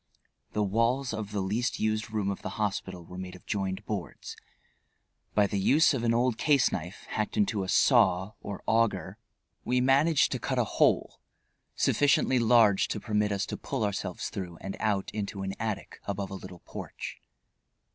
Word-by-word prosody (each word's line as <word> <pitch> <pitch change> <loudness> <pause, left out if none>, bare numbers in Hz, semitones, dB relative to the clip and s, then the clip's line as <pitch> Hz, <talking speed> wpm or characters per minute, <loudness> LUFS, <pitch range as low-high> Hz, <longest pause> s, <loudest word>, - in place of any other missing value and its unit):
The 105 - +1
walls 115 +5 +1
of 110 -2 -4
the 105 -2 -1
least 110 +6 -1
used 110 +1 0
room 105 -2 -1
of 100 - -6
the 95 - -6
hospital 95 -4 -2
were 90 +2 -9
made 95 0 -7
of 90 - -15
joined 95 0 -2
boards. 100 -5 -5 1.0
By 105 - +5
the 100 0 -1
use 155 - +4
of 125 -4 -2
an 115 - +3
old 120 0 +1
case 145 -4 +4
knife, 90 +3 -5
hacked 105 -1 -2
into 105 -1 +1
a 95 - -5
saw, 95 +2 +4
or 100 -1 -7
auger, 110 -3 +1 0.4
we 125 +1 +1
managed 140 +5 +4
to - - -1
cut - - -2
a - - +4
hole - - +1 0.5
sufficiently 140 -3 +3
large 115 -4 +5
to 105 - -3
permit 105 -1 0
us 100 -1 0
to - - -5
pull - - -3
ourselves 100 -2 -2
through 90 -3 -6
and 95 - -5
out 105 -3 0
into 100 -2 -4
an 95 0 -3
attic 110 -3 -4
above 100 -1 -3
a - - -5
little 90 -2 -9
porch. - - -7
105 Hz, 175 wpm, -29 LUFS, 95-115 Hz, 1.0 s, By